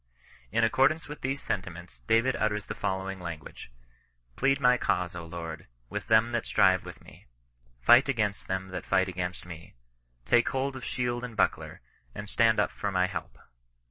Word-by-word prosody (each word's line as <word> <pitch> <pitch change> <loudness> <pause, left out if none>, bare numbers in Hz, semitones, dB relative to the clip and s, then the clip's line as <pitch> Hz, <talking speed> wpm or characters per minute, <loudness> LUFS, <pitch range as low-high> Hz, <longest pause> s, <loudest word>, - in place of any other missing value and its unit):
In 115 - +2
accordance 135 +7 +3
with 150 +1 -8
these 135 +2 -2
sentiments 90 -2 -5
David 115 +4 +3
utters 105 -1 -1
the - - -5
fol 95 0 -2
lowing 95 0 -5
language: 85 -7 -8 0.3
" - - -40
Plead 135 +1 +2
my 125 -2 +5
cause, 90 -7 0
Lord, 85 -2 -7 0.2
with - - -4
them 110 +1 +4
that 120 -1 -2
strive 95 -1 +3
with - - -10
me: - - -17 0.6
fight 125 - +7
against 105 -6 -1
th^n 95 0 -3
that 90 -2 -5
fight 95 -1 +3
against 90 0 -4
me. 85 -5 -11 0.5
Take 120 - +4
hold 135 +1 -2
of 130 - -8
shield 120 0 -2
and 120 -3 -7
buckler, - - 0 0.3
and 105 0 -6
stand 110 +1 +3
up 105 - +2
for 100 - -3
my 90 -1 +2
help. 95 - -6
105 Hz, 175 wpm, -28 LUFS, 90-120 Hz, 0.6 s, fight